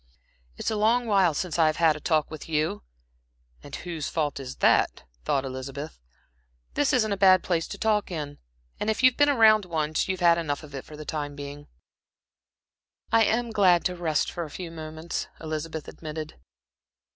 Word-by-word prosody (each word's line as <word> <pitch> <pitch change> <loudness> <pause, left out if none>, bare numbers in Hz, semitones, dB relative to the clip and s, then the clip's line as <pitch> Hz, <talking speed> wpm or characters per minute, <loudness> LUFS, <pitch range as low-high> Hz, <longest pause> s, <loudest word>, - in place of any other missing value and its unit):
"It's - - -2
a - - -1
long 225 +4 +2
while 195 -7 +3
since 175 +1 -2
I've 155 -1 +4
had 165 -2 +3
a - - -7
talk 155 0 0
with 155 0 -8
you. 155 -8 0 0.8
('And - - -8
whose 165 -4 -5
fault 150 -3 -1
is 130 -1 -7
that,' - - +2 0.2
thought 135 -1 +1
Elizabeth.) 135 - -6 0.7
This 290 - +2
isn't 220 -4 +2
a 200 - 0
bad 185 -1 +6
place 165 -3 0
to - - -7
talk 215 -2 +1
in, 150 -5 -5 0.4
and 210 - -1
if 220 +4 -1
you've 255 -1 +6
been 290 0 +4
around 220 -6 +5
once, 155 -3 -1
you've 190 -1 -2
had 170 -1 +5
enough 145 -3 -3
of 150 - -12
it 135 - -6
for 150 - -11
the 155 - -8
time 145 -2 -4
being." 145 0 -8 1.4
"I 225 0 +5
am 235 +2 0
glad 185 -5 +4
to 180 - 0
rest 160 -4 0
for 175 - -4
a 155 - -7
few 170 +2 -7
minutes," 160 +1 -5
Elizabeth 155 0 -5
admitted. 155 -1 -7
165 Hz, 180 wpm, -26 LUFS, 150-200 Hz, 1.4 s, bad